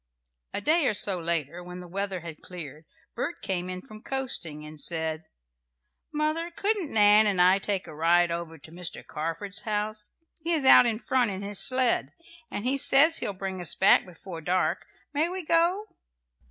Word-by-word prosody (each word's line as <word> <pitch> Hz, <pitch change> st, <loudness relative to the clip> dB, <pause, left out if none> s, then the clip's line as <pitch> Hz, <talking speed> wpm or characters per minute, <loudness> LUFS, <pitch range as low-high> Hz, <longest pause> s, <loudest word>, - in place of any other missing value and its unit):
A -, -, -4 dB
day 310 Hz, +5 st, +2 dB
or 215 Hz, -, +1 dB
so 195 Hz, -2 st, 0 dB
later, 170 Hz, 0 st, -2 dB
when 180 Hz, 0 st, -9 dB
the 180 Hz, -, -9 dB
weather 195 Hz, 0 st, -4 dB
had 160 Hz, -2 st, -9 dB
cleared, 155 Hz, -4 st, -9 dB, 0.3 s
Bert 345 Hz, -, -3 dB
came 180 Hz, -1 st, -3 dB
in 185 Hz, 0 st, -6 dB
from 215 Hz, 0 st, -13 dB
coasting, 185 Hz, -, -4 dB
and 150 Hz, -1 st, -3 dB
said, 160 Hz, -1 st, 0 dB, 0.9 s
"Mother, 310 Hz, +2 st, -1 dB
couldn't 395 Hz, -2 st, 0 dB
Nan 210 Hz, 0 st, +6 dB
and 195 Hz, -3 st, 0 dB
I 185 Hz, +2 st, +5 dB
take 195 Hz, -1 st, -2 dB
a 155 Hz, -, -10 dB
ride 170 Hz, +2 st, +3 dB
over 170 Hz, -1 st, -5 dB
to 155 Hz, +2 st, -15 dB
Mr. 175 Hz, 0 st, -6 dB
Carford's 165 Hz, +6 st, -3 dB
house? 210 Hz, 0 st, -3 dB, 0.3 s
He 335 Hz, +2 st, 0 dB
is 300 Hz, -5 st, 0 dB
out 250 Hz, -, +8 dB
in 225 Hz, -2 st, 0 dB
front 245 Hz, 0 st, +1 dB
in 195 Hz, 0 st, -5 dB
his 200 Hz, -1 st, -1 dB
sled, 255 Hz, -2 st, +2 dB, 0.4 s
and 205 Hz, -, -5 dB
he 270 Hz, +2 st, +2 dB
says 320 Hz, +5 st, +4 dB
he'll 205 Hz, -, -3 dB
bring 190 Hz, -1 st, -5 dB
us 175 Hz, -, +1 dB
back 190 Hz, -, +5 dB
before 175 Hz, -1 st, -10 dB
dark. 180 Hz, +3 st, -1 dB, 0.3 s
May 305 Hz, +4 st, +1 dB
we 370 Hz, -1 st, -5 dB
go?" 340 Hz, +6 st, +2 dB
195 Hz, 180 wpm, -27 LUFS, 170-260 Hz, 0.9 s, out